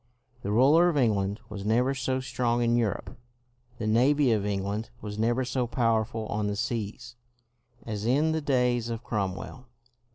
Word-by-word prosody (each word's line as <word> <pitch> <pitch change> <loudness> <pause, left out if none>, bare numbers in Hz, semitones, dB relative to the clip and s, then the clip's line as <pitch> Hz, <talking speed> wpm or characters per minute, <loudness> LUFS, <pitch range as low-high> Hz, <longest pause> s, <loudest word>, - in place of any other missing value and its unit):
The 100 - -4
ruler 145 +11 +5
of 160 - -1
England 105 -5 +1
was 100 -2 -7
never 120 +6 +2
so 130 0 -1
strong 120 -2 0
in 120 0 +2
Europe, 115 -1 -2 0.6
the 115 - -4
navy 130 +5 +3
of 105 -2 +1
England 100 +2 -2
was 105 0 -6
never 120 +3 +1
so 125 -1 -1
powerful 115 -2 0
on 105 0 -2
the 105 - -1
seas, 115 +2 -4 0.7
as 105 -2 -4
in 140 +7 +2
the 160 0 -1
days 125 -4 +1
of 115 0 -4
Cromwell. 105 +5 -4
115 Hz, 160 wpm, -27 LUFS, 105-130 Hz, 0.7 s, ruler